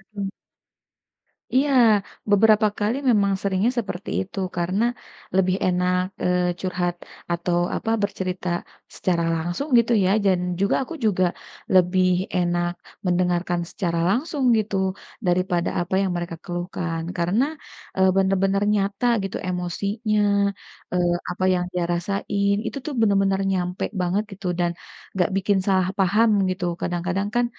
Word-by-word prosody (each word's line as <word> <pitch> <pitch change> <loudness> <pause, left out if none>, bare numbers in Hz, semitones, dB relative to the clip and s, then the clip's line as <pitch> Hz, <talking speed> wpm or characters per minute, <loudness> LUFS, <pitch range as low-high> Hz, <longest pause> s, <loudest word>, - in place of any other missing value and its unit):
Mhm. 200 -1 -2 1.3
Iya, 280 +2 +3 0.6
beberapa 215 +1 +5
kali 215 +4 +1
memang 200 -3 +3
seringnya 200 +4 +1
seperti 200 -3 -5
itu, 190 +1 -9 0.2
karena 185 +5 0 0.5
lebih 185 -1 +3
enak 180 0 +2 0.2
eee, 180 -1 +1
curhat 175 -1 -1 0.4
atau 175 0 0 0.2
apa - - -3
bercerita 185 -2 -3 0.5
secara 170 -2 0
langsung 175 - -3
gitu 235 +1 +1
ya. - - +3 0.2
Dan 190 -2 +3 0.2
juga, 200 - +2
aku 265 - -8
juga 185 -3 +2 0.5
lebih 185 0 +4 0.3
enak 175 0 +1 0.3
mendengarkan 175 -1 +1
secara 170 -3 -2
langsung 275 +5 -1
gitu, 210 -2 -1 0.5
daripada 175 -1 +1
apa 175 +2 -5
yang 190 - 0
mereka 175 -1 -4
keluhkan. 175 -2 -3 0.2
Karena 180 +9 +2 0.5
eee, 190 0 +5
bener-bener 195 +1 +2
nyata 200 +3 0 0.2
gitu 195 - -3
emosinya, 200 +5 -1 0.7
eee, 175 -1 +2 0.2
apa 185 +1 -4
yang 180 -1 +1
dia 180 -1 -1
rasain, 200 +2 0
itu - - -4
tuh 300 - -3
bener-bener 195 -2 +3
nyampe 180 -1 -2 0.2
banget 185 +4 +1
gitu 195 -1 -6
dan 175 -1 +2 0.4
enggak 190 +1 +1
bikin 195 0 +2
salah 185 -2 +3
paham 210 +4 +4 0.2
gitu. 185 -1 -2 0.2
Kadang-kadang 180 +3 -1
kan, 240 0 +3
185 Hz, 130 wpm, -23 LUFS, 175-200 Hz, 1.3 s, beberapa